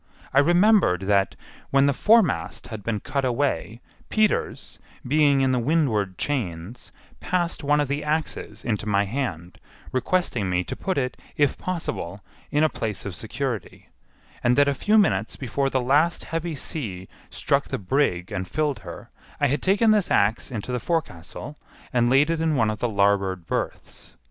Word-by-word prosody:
I 135 - +6
remembered 175 - +4
that, 100 0 +1 0.3
when 135 0 +4
the 140 - +3
foremast 215 - +2
had 110 -3 -6
been 105 0 -2
cut 140 -1 -2
away, 120 - -1 0.3
Peters, 215 -1 0 0.3
being 145 0 +4
in 130 -1 +3
the 125 - +2
windward 115 - +1
chains, 110 - -4 0.3
passed 175 -2 -1
one 145 +1 +3
of 145 - +1
the 145 +2 -2
axes 150 -8 -3
into 105 -2 -2
my 100 -1 +2
hand, 95 - -4 0.3
requesting 130 - 0
me 90 0 +1
to - - -6
put 190 - -2
it, 125 -2 -1 0.2
if 145 -2 +3
possible, 105 - -4 0.3
in 150 +1 +2
a - - +6
place 110 -8 -4
of 100 - -4
security, 125 -2 -5 0.5
and 120 +1 +3
that 145 0 +5
a 140 - +2
few 210 +10 +2
minutes 110 - +2
before 135 +2 -1
the 130 - 0
last 150 +6 +2
heavy 165 0 -3
sea 100 - -4 0.2
struck - - 0
the - - -3
brig 95 -4 0
and 95 0 -3
filled 150 +2 -1
her 85 -2 -10 0.3
I 145 - +3
had 145 0 0
taken 205 +4 +3
this 210 -3 +2
axe 105 +3 +2
into 120 -1 -5
the 125 - -1
forecastle 150 - -4 0.4
and 120 -1 +3
laid 140 +5 +4
it 165 -1 -1
in 160 -2 +1
one 115 -4 +2
of 105 - -6
the 120 - 0
larboard 100 -3 +1
berths. - - -5
130 Hz, 170 wpm, -24 LUFS, 105-150 Hz, 0.5 s, I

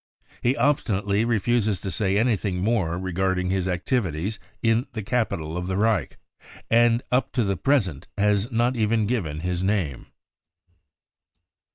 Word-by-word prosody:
44 120 - +2
He 130 - +1
obstinately 110 -6 +1
refuses 110 -3 +1
to 95 - -5
say 95 +3 0
anything 105 -5 +1
more 95 -4 0
regarding 95 0 -1
his 95 -1 0
activities 90 - -1 0.2
in 115 +2 +2
the 110 -3 -4
capital 100 -9 -1
of 90 0 -3
the 95 0 -1
Reich, 105 - +1 0.5
and 120 +1 +4
up 130 +1 +1
to 125 - +1
the 100 -2 0
present 95 - 0
has 105 +2 +2
not 120 +2 +1
even 110 -1 +1
given 90 -10 -2
his 90 0 -2
name." 95 - -1
100 Hz, 145 wpm, -24 LUFS, 90-115 Hz, 0.5 s, and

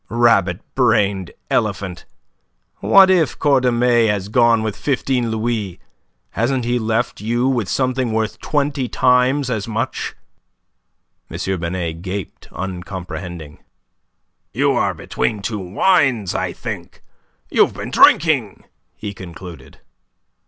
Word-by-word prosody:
"Rabbit 105 -7 +2
brained 105 -7 +2 0.2
elephant! 95 -3 -1 0.7
What 190 -1 +6
if 170 -6 +2
Cordemais 125 -4 +3
has 100 -2 -1
gone 115 -1 +3
with 110 -3 -2
fifteen 130 -3 -1
louis? 110 -4 -2 0.5
Hasn't 120 +3 0
he 120 +1 0
left 115 0 -1
you 120 +2 +1
something 130 +1 0
worth 110 -2 -2
twenty 140 -3 -1
times 125 +2 +2
as 110 -3 -2
much?" 115 +3 -3 1.1
M. - - -6 0.2
Binet 85 -1 -3
gaped 95 0 -6
uncomprehending. 90 -4 -7 0.9
"You - - +2
are - - 0
between 105 - -2
two 105 +2 -3
wines, 110 - +2
I - - -2
think. - - -8 0.5
You've - - +3
been - - -6
drinking," - - +4 0.3
he 105 -1 -6
concluded. 90 -2 -11
115 Hz, 110 wpm, -19 LUFS, 95-125 Hz, 1.1 s, What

